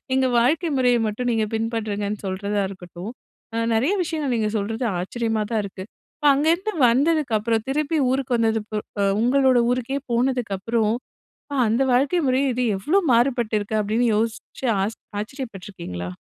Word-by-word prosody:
எங்க 265 Hz, 0 st, +3 dB
வாழ்க்கை 305 Hz, +8 st, +2 dB
முறையை 245 Hz, -2 st, +3 dB
மட்டும் 245 Hz, +4 st, -2 dB
நீங்கள் 220 Hz, -2 st, 0 dB
பின்பற்றுங்கன்னு 215 Hz, -2 st, -2 dB
சொல்றதா 200 Hz, +2 st, -2 dB
இருக்கட்டும். 180 Hz, +2 st, -8 dB, 0.4 s
அ -, -, -2 dB, 0.2 s
நெறைய 265 Hz, -, +2 dB
விஷயங்கள் 310 Hz, -6 st, -2 dB
நீங்கள் 215 Hz, 0 st, -1 dB
சொல்றது 225 Hz, +4 st, -3 dB, 0.2 s
ஆச்சரியமா 225 Hz, +3 st, -1 dB
தான் 220 Hz, -, +2 dB
இருக்கு. 190 Hz, -1 st, -7 dB, 0.3 s
இப்ப 295 Hz, -2 st, +3 dB
அங்கேருந்து 335 Hz, +9 st, +1 dB, 0.2 s
வந்ததுக்கப்புறம், 235 Hz, -5 st, +1 dB
திருப்பி 305 Hz, +3 st, 0 dB
ஊருக்கு 260 Hz, -2 st, 0 dB
வந்தது 225 Hz, -1 st, +2 dB
ப் 210 Hz, -1 st, -3 dB, 0.2 s
அ -, -, +3 dB, 0.2 s
உங்களோட 260 Hz, +1 st, +4 dB
ஊருக்கே 255 Hz, +2 st, -1 dB
போனதுக்கப்புறம், 230 Hz, -3 st, 0 dB, 0.6 s
அ -, -, -2 dB
அந்த 235 Hz, +5 st, +2 dB
வாழ்க்கை 285 Hz, +7 st, +2 dB
முறையும் 260 Hz, +1 st, +2 dB
இது 250 Hz, -, 0 dB
எவ்வளோ 330 Hz, -, +2 dB
மாறுபட்டிருக்கு, 230 Hz, -4 st, +1 dB
அப்படின்னு 225 Hz, +4 st, +1 dB
யோசிச்சு 225 Hz, +3 st, -3 dB, 0.2 s
ஆஸ் 220 Hz, +3 st, -3 dB, 0.2 s
ஆச்சரியப்பட்டுருக்கீங்களா? 195 Hz, -, -6 dB
230 Hz, 140 wpm, -23 LUFS, 210-265 Hz, 0.6 s, உங்களோட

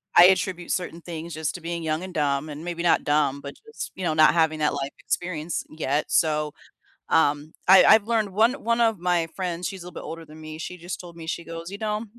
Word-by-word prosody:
I 175 Hz, -, +10 dB
attribute 185 Hz, -1 st, +2 dB
certain 170 Hz, -2 st, -3 dB
things 165 Hz, -1 st, -7 dB
just 155 Hz, -2 st, -2 dB
to 175 Hz, -, -8 dB
being 170 Hz, 0 st, -4 dB
young 155 Hz, +2 st, -1 dB
and 185 Hz, -1 st, -7 dB
dumb, 145 Hz, -1 st, 0 dB
and 150 Hz, +3 st, -7 dB
maybe 170 Hz, -1 st, -4 dB
not 175 Hz, -, +3 dB
dumb, 145 Hz, -2 st, +1 dB
but 140 Hz, -, -7 dB
just, 450 Hz, -, -7 dB
you 190 Hz, -, -7 dB
know, 160 Hz, -3 st, 0 dB
not 155 Hz, +1 st, +6 dB
having 160 Hz, -2 st, +2 dB
that 150 Hz, -1 st, +1 dB
life 140 Hz, 0 st, -3 dB
experience 175 Hz, -2 st, -3 dB
yet, 150 Hz, -1 st, -1 dB
so, 150 Hz, -2 st, +2 dB, 0.6 s
um, 150 Hz, -1 st, +2 dB
I 190 Hz, 0 st, +9 dB
I've 220 Hz, 0 st, +6 dB
learned 220 Hz, -3 st, +1 dB
one 225 Hz, +5 st, +4 dB
one 235 Hz, +1 st, +1 dB
of 225 Hz, -3 st, +3 dB
my 175 Hz, -2 st, +1 dB
friends 180 Hz, -2 st, -3 dB
she's 190 Hz, -3 st, -7 dB
a -, -, -10 dB
little -, -, -10 dB
bit -, -, -9 dB
older 165 Hz, 0 st, -7 dB
than 155 Hz, +1 st, -14 dB
me, 155 Hz, 0 st, -8 dB
she 180 Hz, +2 st, -6 dB
just 175 Hz, +2 st, -6 dB
told 170 Hz, -1 st, -12 dB
me, 160 Hz, -1 st, -9 dB
she 170 Hz, -, -3 dB
goes, 165 Hz, +1 st, -7 dB
"You 200 Hz, -, -7 dB
know" 215 Hz, +1 st, -2 dB
170 Hz, 240 wpm, -25 LUFS, 155-180 Hz, 0.6 s, I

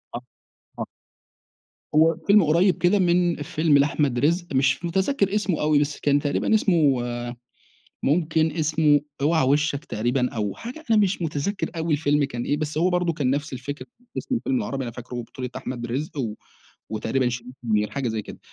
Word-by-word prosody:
آه، 120 Hz, -, -4 dB, 0.6 s
آه. -, -, -2 dB, 1.1 s
هو 160 Hz, +1 st, +5 dB
فيلم 205 Hz, -1 st, +6 dB
قريب 170 Hz, +5 st, +3 dB
كده 180 Hz, +3 st, +3 dB
من 175 Hz, -1 st, +3 dB
فيلم 155 Hz, -1 st, +2 dB
لأحمد 140 Hz, -3 st, +1 dB
رزق 170 Hz, +6 st, +2 dB
مش 135 Hz, +4 st, +2 dB
متذكر 195 Hz, +3 st, +1 dB
اسمه 200 Hz, -5 st, 0 dB
أوي، 150 Hz, -1 st, +3 dB
بس 145 Hz, 0 st, -1 dB
كان 145 Hz, 0 st, +3 dB
تقريبًا 145 Hz, +8 st, 0 dB
اسمه 165 Hz, -10 st, +3 dB, 1.1 s
ممكن 160 Hz, +1 st, +2 dB
اسمه 155 Hz, -2 st, +2 dB, 0.2 s
أوعى 155 Hz, -1 st, +3 dB
وشك 145 Hz, +2 st, +1 dB
تقريبًا 125 Hz, +2 st, 0 dB
أو 105 Hz, -3 st, -3 dB
حاجة 255 Hz, +7 st, -8 dB
أنا 220 Hz, -, +5 dB
مش 195 Hz, -3 st, +1 dB
متذكر 165 Hz, +5 st, -2 dB
أوي 165 Hz, -1 st, 0 dB
الفيلم 145 Hz, 0 st, +2 dB
كان 120 Hz, -4 st, -3 dB
إيه 145 Hz, -, 0 dB
بس 155 Hz, 0 st, -3 dB
هو 175 Hz, +3 st, +3 dB
برضو 180 Hz, -2 st, +1 dB
كان 145 Hz, -5 st, 0 dB
نفس 145 Hz, +1 st, -1 dB
الفكرة 135 Hz, +3 st, -6 dB, 0.3 s
اسم 260 Hz, -, -2 dB
الفيلم 260 Hz, +2 st, 0 dB
العربي 140 Hz, -, -2 dB
أنا 120 Hz, -, -5 dB
فاكره 125 Hz, +1 st, -9 dB
بطولة 125 Hz, +2 st, -7 dB
أحمد 120 Hz, -2 st, -5 dB
رزق 140 Hz, +6 st, -4 dB
و 115 Hz, -5 st, -2 dB, 0.6 s
وتقريبًا 125 Hz, +4 st, 0 dB
شريف 120 Hz, +1 st, -6 dB
منير 105 Hz, -2 st, +1 dB
حاجة 140 Hz, -3 st, -2 dB
زي 110 Hz, -1 st, -2 dB
كده، -, -, -10 dB
150 Hz, 170 wpm, -24 LUFS, 130-175 Hz, 1.1 s, فيلم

